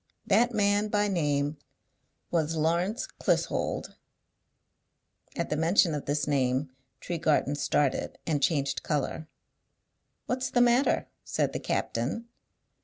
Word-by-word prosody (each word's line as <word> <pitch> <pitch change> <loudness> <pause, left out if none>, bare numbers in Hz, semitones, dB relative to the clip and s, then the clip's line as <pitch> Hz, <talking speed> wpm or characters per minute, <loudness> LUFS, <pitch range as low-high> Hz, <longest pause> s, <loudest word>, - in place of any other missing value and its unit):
That 240 +1 +3
man 205 -1 +2
by 210 0 +1
name 145 -5 0 0.7
was 165 -1 +1
Lawrence 170 +8 0
Clissold." - - 0 1.4
At - - -3
the - - +2
mention 165 +2 +3
of 150 - -4
this 145 +1 0
name 130 -1 +1 0.3
Tregarthen 160 -4 0
started 145 -1 0
and 150 -3 0
changed 140 -2 +1
colour. 150 +1 -2 1.0
"What's 255 +1 -1
the 245 - +1
matter?" 245 +3 +3 0.2
said - - -1
the - - -2
captain. 230 +1 -2
160 Hz, 110 wpm, -28 LUFS, 145-205 Hz, 1.4 s, That